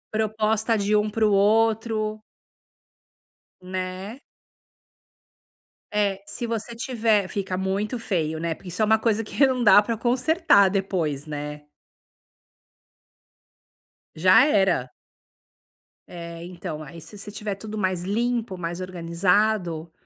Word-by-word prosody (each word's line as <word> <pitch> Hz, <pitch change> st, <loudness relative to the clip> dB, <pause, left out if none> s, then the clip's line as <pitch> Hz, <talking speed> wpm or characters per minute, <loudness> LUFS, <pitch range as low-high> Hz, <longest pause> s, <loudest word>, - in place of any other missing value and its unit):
Proposta 220 Hz, +1 st, +1 dB
de 205 Hz, +1 st, +1 dB
um 210 Hz, 0 st, +2 dB
pro 215 Hz, -1 st, +1 dB
outro 215 Hz, +1 st, +2 dB, 1.4 s
Né. 185 Hz, +5 st, -5 dB, 1.7 s
É, 200 Hz, -2 st, 0 dB
se 205 Hz, +4 st, -5 dB
você 230 Hz, +1 st, -4 dB
tiver 225 Hz, -5 st, +1 dB
fica 190 Hz, -2 st, -3 dB
muito 200 Hz, +5 st, -2 dB
feio, 160 Hz, -7 st, -2 dB
né, 165 Hz, 0 st, -1 dB
porque 180 Hz, -, -11 dB
isso 180 Hz, +5 st, -4 dB
é -, -, +5 dB
um 220 Hz, +1 st, +4 dB
coisa 225 Hz, 0 st, 0 dB
que 275 Hz, +6 st, +2 dB
não 255 Hz, -2 st, 0 dB
dá 205 Hz, -1 st, +8 dB
pra 225 Hz, +1 st, -3 dB
consertar 255 Hz, -, +3 dB
depois, 175 Hz, -7 st, -2 dB
né. 150 Hz, 0 st, -6 dB, 2.5 s
Já 185 Hz, -, +6 dB
era. 190 Hz, -, +2 dB, 1.2 s
É, 170 Hz, -1 st, -8 dB
então, 170 Hz, -3 st, -7 dB
aí 160 Hz, +4 st, -11 dB
se 210 Hz, -, -13 dB
você 205 Hz, +1 st, -8 dB
tiver 205 Hz, -1 st, -4 dB
tudo 215 Hz, +1 st, -7 dB
mais 185 Hz, -3 st, -1 dB
limpo, 230 Hz, 0 st, -1 dB
mais 175 Hz, +1 st, -4 dB
organizado, 180 Hz, -1 st, 0 dB
200 Hz, 115 wpm, -24 LUFS, 180-220 Hz, 2.5 s, dá